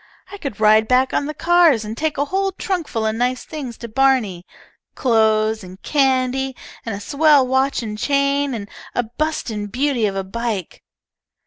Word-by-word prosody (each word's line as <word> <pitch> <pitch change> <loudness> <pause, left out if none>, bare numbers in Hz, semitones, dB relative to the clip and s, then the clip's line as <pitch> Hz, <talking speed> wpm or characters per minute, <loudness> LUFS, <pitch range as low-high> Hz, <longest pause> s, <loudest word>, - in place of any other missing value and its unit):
I 405 - -9
could 275 - -6
ride 215 +1 +5
back 255 +2 +2
on 285 - 0
the 305 - -4
cars 335 -9 +4
and 215 +1 -5
take 310 +3 -2
a 285 - +1
whole 385 +5 -1
trunk 370 -4 -3
full 225 -1 -2
of 220 - +1
nice 250 +2 -1
things 270 -7 -7
to 235 - -7
Barney, 225 -7 +1 0.5
clothes, 220 -2 +2
and 185 +1 -11
candy, 265 -2 +1 0.3
and 225 -3 -4
a - - -6
swell 285 +4 +4
watch 265 0 +1
and 210 -1 -5
chain, 280 0 +1
and 205 -3 -6 0.3
a 245 - +1
bustin' 230 -4 -3
beauty 250 0 0
of 195 - -4
a 195 - -2
bike. 210 -2 -4
255 Hz, 180 wpm, -20 LUFS, 220-280 Hz, 0.5 s, ride